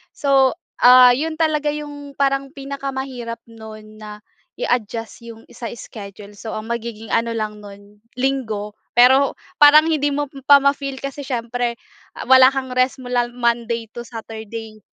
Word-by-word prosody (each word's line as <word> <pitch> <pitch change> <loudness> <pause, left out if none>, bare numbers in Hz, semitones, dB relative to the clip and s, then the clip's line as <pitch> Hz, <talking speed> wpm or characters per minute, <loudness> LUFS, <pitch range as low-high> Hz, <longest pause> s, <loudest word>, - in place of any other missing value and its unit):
So, 275 -1 +3 0.2
ah, 250 0 +8
'yon 315 +5 -1
talaga 310 -2 0
'yong 290 -1 -8
parang 275 0 0
pinakamahirap 270 -4 -6
noon 215 -1 -12
na 210 0 -10 0.3
i-adjust 230 - -3
'yong 225 -1 -11
sa 235 - -7
schedule. 205 -2 -11
So 225 - -6
ang 215 +2 -6
magiging 230 -1 -5
ano 230 0 0
lang 215 -1 -4
noon 205 0 -14 0.2
Linggo. 230 -6 -2 0.2
Pero 265 +3 +5 0.2
parang 300 +2 +8
hindi 295 -2 +1
mo 290 0 -2 0.2
pa 285 - +9
ma-feel 280 -1 0
kasi 275 +1 -5
siyempre 240 -1 -2 0.4
ah, - - -6
wala 260 0 +8
kang 265 -1 -4
rest 255 +1 +1
mula 245 -1 0
Monday 235 -2 -1
to 240 - -8
Saturday. 220 -1 -8
245 Hz, 145 wpm, -20 LUFS, 225-275 Hz, 0.4 s, pa